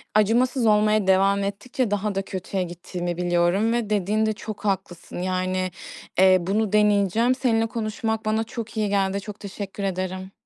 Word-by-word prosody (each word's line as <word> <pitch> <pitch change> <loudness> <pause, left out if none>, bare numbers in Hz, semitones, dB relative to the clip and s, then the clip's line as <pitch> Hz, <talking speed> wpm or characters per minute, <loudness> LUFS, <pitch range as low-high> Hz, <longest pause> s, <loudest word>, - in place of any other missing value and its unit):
acımasız 235 +4 +3
olmaya 210 -1 +3
devam 195 +1 +3
ettikçe 215 +5 -2
daha 205 0 -1
da 195 - +1
kötüye 190 0 -3
gittiğimi 175 0 -5
biliyorum 175 +5 +2
ve 235 -3 -1
dediğinde 215 +2 +1
çok 215 0 -8
haklısın. 190 -3 -3
Yani, 185 0 -1 0.5
eee, 185 0 +7
bunu 200 +3 0
deneyeceğim. 210 +3 +3
Seninle 230 -4 +1
konuşmak 220 0 -3
bana 215 +1 +1
çok 225 0 -7
iyi 210 -1 +1
geldi. 200 0 0
Çok 210 0 -9
teşekkür 200 0 -6
ederim. 185 0 -3
200 Hz, 150 wpm, -24 LUFS, 185-220 Hz, 0.5 s, eee